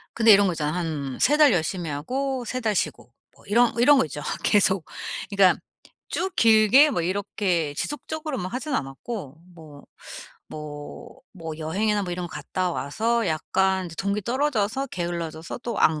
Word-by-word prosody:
근데 225 -1 +6
이런 200 -1 +6
거 180 - 0
있잖아요. 150 -1 -2
한 155 -7 -3
3 295 +3 +4
달 300 -3 +7
열심히 175 0 -1
하고 255 - -3
3 255 +3 -3
달 215 -3 0
쉬고 - - -2 0.2
뭐 - - -21
이런 235 +4 +3
이런 285 +4 +6
거 265 - +3
있죠 150 0 -7 0.2
계속. 190 -4 +3 0.4
그러니까 195 -3 +4 0.5
쭉 370 +1 -3
길게 225 +6 +6
뭐 175 - -1
이렇게 180 -3 -1
지속적으로 305 - -4
막 185 +2 -5
하진 280 +3 -3
않았고 145 - -5 0.2
뭐, 150 -4 -13 0.7
뭐, 150 -1 -9
뭐 165 -4 -7
여행이나 205 +7 0
뭐 175 - -4
이런 175 0 -4
거 - - -18
갔다 185 -1 -2
와서 220 - -1
약간 190 +3 0
이제 165 - -10
동기 200 +1 -1
떨어져서 260 0 0
게을러져서 170 -1 -5
또 240 -1 -5
안 155 -1 +3
190 Hz, 310 characters per minute, -24 LUFS, 160-235 Hz, 0.7 s, 달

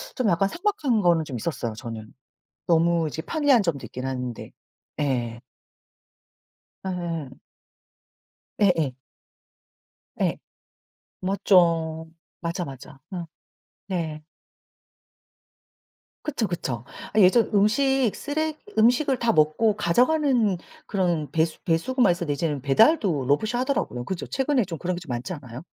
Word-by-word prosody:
좀 255 - 0
약간 195 +2 +2
삭막한 325 - 0
거는 170 -3 +3
좀 135 -4 -5
있었어요, 120 -3 -3
저는. 110 0 -8 0.5
너무 170 -1 +3
이제 160 +2 -4
편리한 280 - +3
점도 165 -7 -2
있긴 130 +1 -6
한데. 125 -3 -4 0.5
예. 120 -5 -1 1.5
예. 170 -6 -3 1.3
예예. 165 -10 +3 1.3
예. - - +1 0.9
맞죠. 170 -4 +2 0.3
맞아, 170 +1 -3
맞아. 135 +1 -11
음. 175 -2 -4 0.6
네. 165 -5 -3 2.0
그쵸, 255 -7 -1
그쵸. 125 -9 -3 0.3
아 215 - +1
예전 200 +5 +5
음식 250 +4 +3
쓰레기 310 +1 -2 0.2
음식을 250 +4 +4
다 235 -1 +2
먹고 200 +7 +3
가져가는 245 - +2 0.3
그런 175 -7 0
배수 160 +1 0
배수구만 195 +5 +2
있었는데 170 -3 -2
이제는 145 -2 -2
배달도 170 - +3
로봇이 150 +10 +2
하더라고요. 250 - -1
그죠. 190 -3 -4
최근에 265 -2 +1
좀 170 -3 -6
그런 180 +2 -2
게 - - -6
좀 150 - -12
많지 120 +7 -3
않아요? 130 -1 -9
175 Hz, 240 characters per minute, -25 LUFS, 150-225 Hz, 2.0 s, 예전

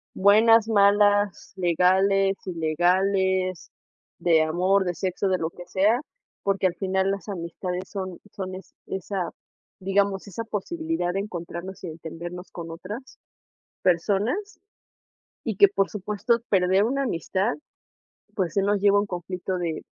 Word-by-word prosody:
Buenas, 220 +3 +6
malas, 205 -1 +3
legales, 190 +2 +3
ilegales, 185 +2 +1 0.5
de 165 -2 +4
amor, 185 +5 +2
de 180 - -1
sexo, 185 +2 -1
de 185 - +2
lo 160 - -2
que 175 +1 -11
sea, 200 +7 +2 0.4
porque 195 -1 +2
al 180 - -3
final 190 0 0
las 200 +2 -5
amistades 180 0 -4
son 190 -3 -5
son 190 -2 -5
es 185 -1 -12
esa, 190 -1 -3 0.5
digamos, 195 +1 0
esa 200 +4 -5
posibilidad 275 - -2
de 195 - 0
encontrarnos 180 -1 -7
y - - -4
entendernos 170 +3 -8
con 165 -1 -7
otras 205 +10 -8 0.6
personas, 205 - 0 0.8
y 220 -4 -2
que 200 - +8
por 195 0 0
supuesto 210 +3 0
perder 190 +1 +3
una 275 +4 0
amistad, 200 -1 -1 0.8
pues, 180 -6 -1
si 200 - +3
nos 200 +1 +1
lleva 200 0 +5
a - - +5
un - - -4
conflicto 185 0 -4
de 170 -3 -3
190 Hz, 140 wpm, -25 LUFS, 180-205 Hz, 0.8 s, que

